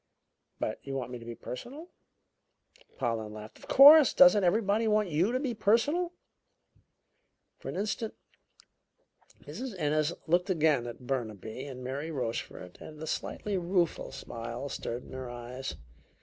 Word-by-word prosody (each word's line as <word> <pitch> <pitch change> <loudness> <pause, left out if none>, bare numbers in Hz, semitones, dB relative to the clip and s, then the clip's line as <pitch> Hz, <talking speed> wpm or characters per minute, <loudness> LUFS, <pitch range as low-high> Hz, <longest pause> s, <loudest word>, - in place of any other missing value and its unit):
"But - - -2
you 135 -1 -6
want 125 -2 -4
me 125 - -6
to 115 - -12
be 120 0 -6
personal?" 280 - -8 1.1
Pollen 110 -2 -2
laughed. 110 0 -10
"Of - - -14
course! 290 +1 +9
Doesn't 265 -7 +7
everybody 210 +4 +2
want 210 -2 +2
you 170 +8 +1
to 255 - 0
be 260 -3 -2
personal?" 235 - +2 1.5
For - - -7
an - - -5
instant 215 +3 -3 1.3
Mrs. 215 - -6
Ennis 155 0 +1
looked 175 +4 +2
again 155 -8 +2
at 120 +1 -9
Burnaby 115 -1 -4
and 130 -2 -8
Mary 140 +5 -4
Rochefort, 115 - -5
and 155 -1 -10
a 160 - -5
slightly 195 +5 -3
rueful 175 -1 0
smile 115 +4 -6
stirred 120 -1 -5
in - - -14
her 130 -1 -6
eyes. 120 +2 -6
155 Hz, 145 wpm, -30 LUFS, -, 1.5 s, course